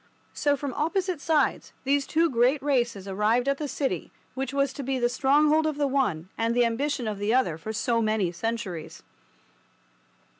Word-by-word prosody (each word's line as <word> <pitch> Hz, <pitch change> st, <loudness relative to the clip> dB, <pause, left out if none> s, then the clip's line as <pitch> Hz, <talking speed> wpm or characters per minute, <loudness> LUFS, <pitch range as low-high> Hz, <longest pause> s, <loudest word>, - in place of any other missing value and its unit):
So, 290 Hz, -1 st, +1 dB
from 275 Hz, -2 st, -4 dB
opposite 360 Hz, +2 st, -1 dB
sides, 305 Hz, -4 st, +1 dB
those 280 Hz, 0 st, +1 dB
two 330 Hz, +2 st, +3 dB
great 255 Hz, +1 st, +2 dB
races 240 Hz, -8 st, 0 dB
arrived 215 Hz, +6 st, +1 dB
at 275 Hz, 0 st, +1 dB
the 300 Hz, -, -2 dB
city 275 Hz, 0 st, -3 dB, 0.2 s
which 270 Hz, +1 st, -3 dB
was 275 Hz, -1 st, 0 dB
to 285 Hz, -, -6 dB
be 265 Hz, 0 st, -1 dB
the 240 Hz, -1 st, +2 dB
stronghold 295 Hz, +5 st, +3 dB
of 305 Hz, -2 st, -2 dB
the 290 Hz, -, +1 dB
one 250 Hz, -, 0 dB
and 230 Hz, +1 st, +1 dB
the 245 Hz, -1 st, +4 dB
ambition 245 Hz, +1 st, -1 dB
of 210 Hz, -2 st, -3 dB
the 210 Hz, +4 st, +1 dB
other 255 Hz, -12 st, +2 dB
for 165 Hz, +7 st, -6 dB
so 230 Hz, +1 st, 0 dB
many 215 Hz, -5 st, +1 dB
centuries. 190 Hz, -3 st, -5 dB
260 Hz, 180 wpm, -26 LUFS, 225-285 Hz, 0.2 s, the